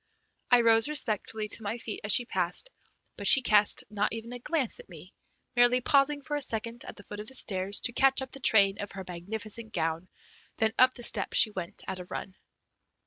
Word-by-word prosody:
I 245 -1 +5
rose 225 +2 +3
respectfully 220 -6 0
to 210 - -2
my 220 +2 -4
feet 230 -3 -7
as 205 - +3
she 245 - +6
passed, - - -1 0.5
but 200 - -2
she 270 - +8
cast 210 -2 +3
not 210 0 -1
even 230 +1 -7
a 245 - -7
glance 290 - -2
at 485 - -14
me, - - -14 0.4
merely 245 +1 +4
pausing 285 +2 +1
for 295 0 -4
a 290 - -2
second 230 -2 -2
at - - -9
the 205 - -13
foot 205 - -9
of 210 - -8
the 265 - -6
stairs 195 -3 -1
to 245 - -1
catch 270 +2 +3
up 265 - -10
the 275 - -8
train 200 -6 +4
of 205 - -7
her 190 -1 -8
magnificent 215 +5 -5
gown, 165 +3 -3 0.5
then 220 0 +1
up 255 0 +5
the 240 - -9
steps - - +1
she 215 - +5
went 185 -4 -7
at 190 -1 -5
a 180 - -8
run. 190 +1 -7
225 Hz, 215 wpm, -28 LUFS, 205-250 Hz, 0.5 s, she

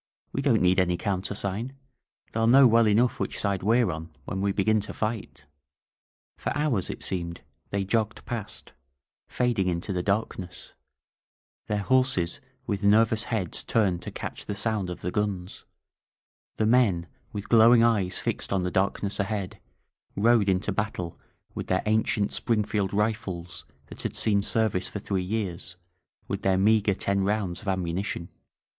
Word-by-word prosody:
*^We 135 - 0
don't 125 -8 +3
need 90 +1 +4
any 90 -1 +2
countersign! 100 +5 -2 0.6
TheyHl 115 0 +2
know 135 +2 +8
well 115 -1 +5
enough 115 +4 +2
which - - -2
side 100 -2 0
we^re 115 +1 +3
on 80 +1 -7 0.2
when 95 - -3
we 100 0 +1
b^in 110 +2 +2
to - - -7
fi^t 110 -7 -4
f - - -26 0.9
For - - -2
hoars, 145 -11 0
it - - -6
geemed, 85 -2 -3 0.3
they 100 0 -1
jogged 110 +2 -1
past, 110 -3 -6 0.6
fading 120 -7 0
into 90 +3 -2
the 90 - 0
darkness, 100 -2 -3 0.9
their 105 -1 -1
horses 130 -9 +2 0.2
with 100 -1 -2
nerroos 110 +2 +4
heads 100 -8 -1
tamed 95 -6 +1
to - - -6
catch - - -7
the 100 - -3
sound 105 -2 -1
of 90 - -6
the 90 - -2
guns, 100 -3 -3 0.9
the 110 - +2
men 110 -8 +3 0.3
with 105 -1 -6
growing 115 +1 +7
eyes 100 -6 +2
fixed - - -2
on 95 -2 +1
the 90 - -1
darkness 100 +2 0
ahead 100 -2 -2 0.3
— - - -38
^rode 110 0 +4
into 95 +1 +1
battle 95 -6 -3 0.3
with - - -5
their 95 0 +1
ancient 110 -1 +1
Springfield 105 -3 0
rifles 95 -5 -2 0.2
that - - -10
had - - -4
seen 100 -2 +2
ser 110 +2 +1
vice 95 -2 -2
for - - -6
three 100 -2 -2
years, 95 -2 -3 0.5
with - - -3
their 95 -1 +2
meager 105 0 +3
ten 100 0 0
rounds 95 -4 -1
of 105 - -12
ammunition. 90 -1 -2
100 Hz, 160 wpm, -27 LUFS, 95-110 Hz, 0.9 s, know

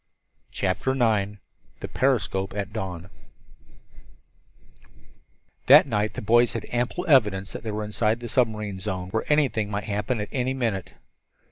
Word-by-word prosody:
CHAPTER 100 +7 -1
IX 110 -6 +1 0.5
THE - - -5
PERISCOPE 105 -7 0
AT 100 0 -4
DAWN 95 -4 -5 2.6
That 145 +4 +9
night 110 -5 -1
the - - -5
boys 120 +3 +4
had 115 - -4
ample 125 +9 -1
evidence 105 - +3
that - - -7
they 110 - -5
were 105 0 -3
inside 110 +2 0
the 120 - -6
submarine 105 -5 -1
zone, 90 0 -4
where 110 +8 -2
anything 130 -8 +2
might 100 0 -3
happen 105 +3 -2
at 105 - -4
any 130 -1 -1
minute. 115 -8 -2
110 Hz, 140 wpm, -25 LUFS, 100-120 Hz, 2.6 s, That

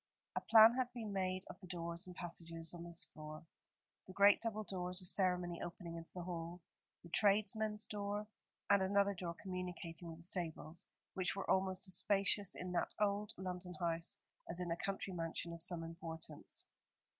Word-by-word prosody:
A - - +1
plan 225 +1 +9
had 255 0 0
been 220 -4 -4
made 185 -1 -1
of - - -9
the 185 - -11
doors 170 0 -2
and 180 - -9
passages 165 -2 -1
on 170 -1 -7
this 170 0 0
floor, 155 +1 -8 0.6
the 185 - -9
great 200 +1 +7
double 215 -2 -1
doors 180 -1 -2
of 180 - +3
ceremony 180 -2 +4
opening 170 -1 -5
into 165 0 -8
the 180 - -4
hall, 170 0 -4 0.4
the 170 - -11
tradesmen's 210 +2 +3
door, 205 0 -2 0.5
and 200 -1 +6
another 200 +1 +3
door 175 -2 -4
communicating 180 -2 -5
with 165 -1 -7
the 165 - -11
stables, 170 -1 -3 0.3
which 185 -1 0
were 195 - -3
almost 190 0 +2
as 185 - -2
spacious 200 -1 +2
in 180 0 -4
that 175 - 0
old 210 0 +1
London 180 -1 -4
house 170 -2 -2 0.3
as 170 - 0
in 175 -2 -2
a - - +2
country 195 +1 -3
mansion 170 0 -3
of 170 - -6
some 175 -1 -2
importance. 165 0 -5
180 Hz, 180 wpm, -39 LUFS, 170-200 Hz, 0.6 s, plan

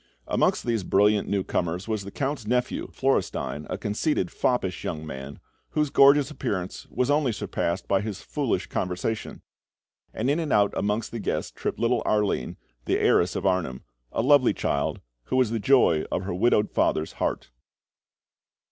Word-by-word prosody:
Amongst - - +1
these 115 -4 0
brilliant 105 +3 +3
newcomers 90 -2 -1
was 110 -3 -2
the 100 - -7
Count's 135 -1 -3
nephew, 125 +1 0
Florestein, 95 - -1
a - - -2
conceited, 105 - -1
foppish 95 -8 -1
young 80 -2 -4
man, 65 -1 -8 0.3
whose 150 -2 +1
gorgeous 140 +1 +6
appearance 100 -11 -4
was 125 +2 0
only 145 -4 +2
surpassed 85 -4 -2
by 95 -1 +2
his 105 -3 -5
foolish - - -1
conversation; 90 +5 -3 0.7
and 110 - -2
in 145 +4 +2
and 160 -4 -2
out 100 -1 +3
amongst 105 +3 -1
the 115 - -4
guests - - -2
tripped - - -4
little 120 +1 +1
Arline, 105 -1 0 0.3
the - - +1
heiress 85 +1 +3
of - - -3
Arnheim 90 -9 0 0.3
a 115 - -1
lovely 140 -1 +5
child, 70 - -1 0.2
who - - -2
was 130 -4 +3
the 115 - -1
joy 100 - +4
of 90 - -1
her 95 - -3
widowed 105 +2 +2
father's 80 0 +1
heart. - - -2
105 Hz, 160 wpm, -26 LUFS, 90-125 Hz, 0.7 s, gorgeous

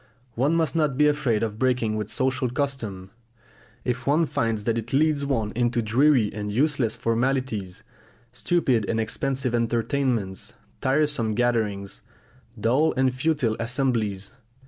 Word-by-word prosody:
One 140 +8 +1
must 165 0 0
not 150 -5 +1
be 150 0 +5
afraid 140 -7 +1
of 110 -1 -3
breaking 125 -4 +1
with 105 -1 -3
social 130 0 0
custom, 120 -9 -3 0.7
if 125 +1 -2
one 155 +4 +3
finds 115 -6 -1
that 115 +1 0
it 115 +2 -8
leads 145 0 +2
one 115 -6 0
into 120 +1 0
dreary 120 0 +3
and 105 0 -4
useless 130 -1 +1
formalities, 115 -5 -1 0.5
stupid 125 - 0
and 115 - 0
expensive 130 +3 -2
entertainments, 115 -3 -1 0.3
tiresome 135 -5 +1
gatherings, 105 - -1 0.6
dull 130 +9 +2
and 130 -1 +2
futile 130 -4 0
assemblies. 115 -5 -1
120 Hz, 130 wpm, -25 LUFS, 110-135 Hz, 0.7 s, be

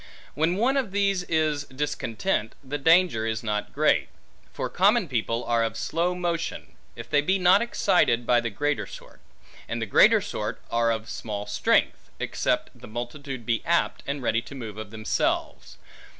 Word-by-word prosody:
When 160 +5 +1
one 250 +7 +2
of 250 -8 -1
these 200 -2 +2
is 155 -3 0
discontent, 130 - -2
the 145 +2 -4
danger 165 -7 +4
is 110 0 -2
not 105 -1 -2
great; - - +2 0.4
for - - -3
common 200 +2 +3
people 115 -2 -1
are 115 -1 +1
of 115 -1 -2
slow 175 +3 -1
motion, 170 -2 -3 0.2
if - - -8
they 145 -1 +3
be 190 +6 +1
not 185 +2 +5
excited 175 - +2
by 120 0 +4
the 120 - -2
greater 145 +8 -1
sort; - - -13 0.5
and 115 - -2
the 115 - -2
greater 100 - +6
sort - - -4
are 115 0 +2
of 110 -1 -3
small 105 -2 -5
strength, - - +1
except - - -1
the - - -13
multitude 120 +2 -6
be 115 -1 0
apt, 170 0 +1
and 140 -1 -3
ready 115 -1 +1
to 130 +4 -11
move 110 -5 -7
of 110 -2 -7
themselves. 110 0 -2
140 Hz, 170 wpm, -26 LUFS, 115-175 Hz, 0.5 s, greater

